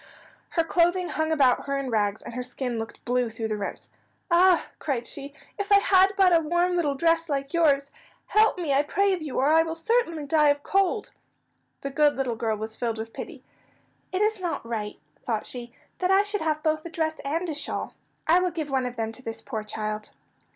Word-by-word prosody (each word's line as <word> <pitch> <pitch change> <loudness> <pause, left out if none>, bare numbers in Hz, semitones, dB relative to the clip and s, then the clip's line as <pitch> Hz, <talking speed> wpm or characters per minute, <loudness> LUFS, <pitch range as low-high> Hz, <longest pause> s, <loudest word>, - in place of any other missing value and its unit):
Her 330 - +1
clothing 350 +2 +2
hung 315 0 -1
about 275 -4 +3
her 275 0 0
in 270 -2 -3
rags, 205 -2 0
and - - -8
her 250 - -3
skin 250 -1 -4
looked 225 0 -8
blue 245 -1 +1
through 225 0 -4
the 215 - -1
rents. 200 - -5 0.4
"Ah," 355 0 +5
cried 260 -6 -2
she, 280 +3 -7 0.3
"if 405 0 -3
I - - +9
had 390 -1 +4
but 375 -2 +5
a - - +6
warm 345 +3 +1
little 300 -5 +1
dress 330 +2 +2
like 275 0 -2
yours! 280 -4 +3 0.3
Help 435 -1 +3
me, 325 -6 -1
I 275 - +4
pray 395 +7 +1
of 365 - -3
you, 300 -4 -5
or 265 - +3
I 320 +1 +6
will 325 0 -2
certainly 335 -5 0
die 300 +1 +3
of 285 0 +1
cold." 390 +1 +1 0.7
The 275 - -4
good 295 +1 +3
little 260 -3 -1
girl 220 -1 -1
was 220 +1 -5
filled 230 -2 -2
with 225 +1 -6
pity. - - -8 0.7
"It 380 +2 +1
is 430 -1 +1
not 335 -9 -3
right," 215 -3 -4 0.2
thought 220 -3 -2
she, 240 -1 -7 0.3
"that 365 - +1
I 385 +1 +5
should 415 0 -2
have 310 -1 -1
both 310 0 +1
a 340 - -7
dress 315 -1 -2
and 325 +6 -1
a 320 - -2
shawl. 300 - -3 0.3
I 335 +3 +5
will 365 0 +1
give 315 -4 -5
one 260 -2 +1
of 245 - -7
them 225 -1 -2
to 240 - -11
this 225 -3 -7
poor 220 -5 -4
child." 215 0 -4
300 Hz, 220 wpm, -26 LUFS, 245-345 Hz, 0.7 s, I